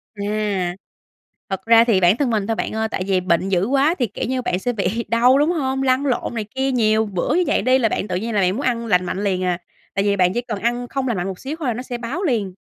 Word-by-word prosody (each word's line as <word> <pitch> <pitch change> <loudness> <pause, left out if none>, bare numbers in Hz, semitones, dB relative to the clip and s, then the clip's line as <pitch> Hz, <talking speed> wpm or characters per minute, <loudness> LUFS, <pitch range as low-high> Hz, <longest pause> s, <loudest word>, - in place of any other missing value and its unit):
À. 205 -3 -2 0.8
Thật 190 -1 -4
ra 230 0 +7
thì 225 -5 +3
bản 180 +5 +4
thân 275 -2 +1
mình 210 -3 0
thôi 225 - 0
bạn - - -3
ơi, 220 0 0
tại 185 - -2
vì 190 -2 +2
bệnh 180 +1 +1
dữ 185 -1 +1
quá 280 +5 +2
thì, 245 - +1
kiểu 205 - -5
như, 255 +1 -1
bạn 185 -7 -1
sẽ 245 +6 -2
bị 225 +2 -2
đau, 245 +3 +4
đúng 295 +4 +3
hông? 270 -5 -1
Lăn 260 +1 +2
lộn 250 -2 -1
này 220 - -2
kia 265 +1 0
nhiều 220 -3 +2
bữa 205 - -1
như 360 - +3
vậy - - +2
đi, 255 +1 +3
là 225 -3 +2
bạn 205 - -2
tự 185 - -3
nhiên 225 +5 -3
là 205 - +3
bạn 180 -1 +3
muốn 260 - -3
ăn 235 -2 0
lành 180 -5 +2
mạnh 190 +3 -3
liền 185 -2 0
à, 180 -1 0 0.4
tại 195 - 0
vì 200 -1 +2
bạn 180 -1 +2
chỉ 240 - -1
cần 225 -5 -5
ăn 240 +2 -1
không 265 +1 -3
lành 235 -5 -1
mạnh 180 +1 -2
một 190 -2 -6
xíu 280 +4 -5
thôi 265 -7 -1
nó 245 +3 -5
sẽ 245 -1 -5
báo 250 +11 -4
liền. 220 - 0
225 Hz, 290 wpm, -21 LUFS, 195-255 Hz, 0.8 s, ra